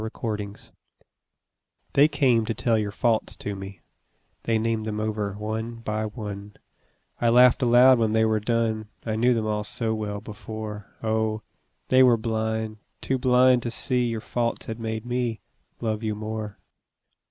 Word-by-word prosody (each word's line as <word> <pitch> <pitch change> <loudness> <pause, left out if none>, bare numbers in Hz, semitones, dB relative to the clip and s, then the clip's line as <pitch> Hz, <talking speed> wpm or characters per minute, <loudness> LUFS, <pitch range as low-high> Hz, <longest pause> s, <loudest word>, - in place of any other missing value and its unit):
Faults 105 -2 -5 1.2
They 145 +2 +6
came 135 -6 +2
to 115 - -1
tell 120 -4 +1
your 105 -2 0
faults 115 0 0
to 105 - -4
me, 95 0 -9 0.6
They 115 -1 +2
named 110 0 -1
them 105 -1 -3
over 105 -2 -2
one 110 +3 -4
by 110 -1 -3
one; 105 -2 -7 0.7
I 120 - +4
laughed 125 +2 +6
aloud 125 +1 +6
when 110 -2 +2
they 110 0 +3
were 110 -1 +2
done, 110 -1 0 0.2
I 110 -2 -1
knew 120 +2 +3
them 110 -1 -1
all 105 -1 -1
so 110 +1 -1
well 105 -2 -3
before, 105 -1 -7 0.2
Oh, 110 0 0 0.5
they 130 0 +6
were 125 -2 +6
blind, 110 -1 -2 0.2
too 130 -1 -1
blind 125 0 +4
to 120 - -3
see 125 +1 0
Your 115 -2 -2
faults 120 +1 -2
had 115 0 -6
made 110 0 -4
me 120 -3 -1 0.4
love 110 -2 -1
you 110 -2 -2
more. 110 -1 -5
110 Hz, 160 wpm, -25 LUFS, 110-120 Hz, 1.2 s, They